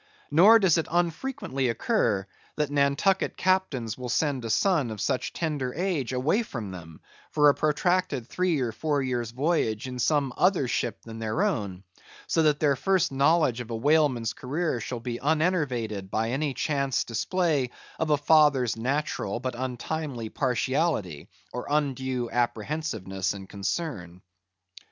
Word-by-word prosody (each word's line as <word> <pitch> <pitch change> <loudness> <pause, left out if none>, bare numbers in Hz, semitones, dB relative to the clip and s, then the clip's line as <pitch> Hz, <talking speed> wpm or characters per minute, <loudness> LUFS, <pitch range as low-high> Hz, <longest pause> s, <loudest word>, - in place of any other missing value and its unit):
Nor 195 +10 +8
does 185 -6 +3
it 160 - -2
unfrequently 170 - -1
occur, 115 - +1 0.3
that 150 -2 -1
Nantucket 145 +7 +2
captains 185 - 0
will 125 -1 -5
send 135 0 0
a 115 - -4
son 150 - +2
of 110 -1 -6
such 125 - -1
tender 145 -6 -3
age 170 -8 -1
away 140 - +1
from 115 - -6
them, 80 -3 -10 0.3
for 150 -1 +5
a - - +5
protracted 155 -3 0
three 180 -4 0
or 120 -3 -1
four 145 +4 -1
years' 120 -3 -2
voyage 130 -4 0
in 125 -1 -6
some 140 -1 +1
other 180 -7 +2
ship 120 -1 -2
than 115 -1 -9
their 115 - -1
own; 100 - -2 0.4
so 165 - +1
that 150 -2 +3
their 145 -2 +3
first 190 +2 +1
knowledge 140 -3 +3
of 120 - -9
a 115 - -3
whaleman's 135 -2 +2
career 150 +1 -2
shall 120 +1 -5
be 120 0 -4
unenervated 135 - 0
by 110 +3 -1
any 140 +1 -1
chance 140 -3 0
display 145 - 0 0.3
of 160 - 0
a 150 - +4
father's 145 -5 +4
natural 125 -3 -2
but 130 0 -3
untimely 130 0 -4
partiality, 130 - -1 0.2
or 125 - -5
undue 130 -4 -1
apprehensiveness 110 - -2
and 95 -1 -9
concern. 100 - -4
135 Hz, 150 wpm, -27 LUFS, 115-160 Hz, 0.4 s, Nor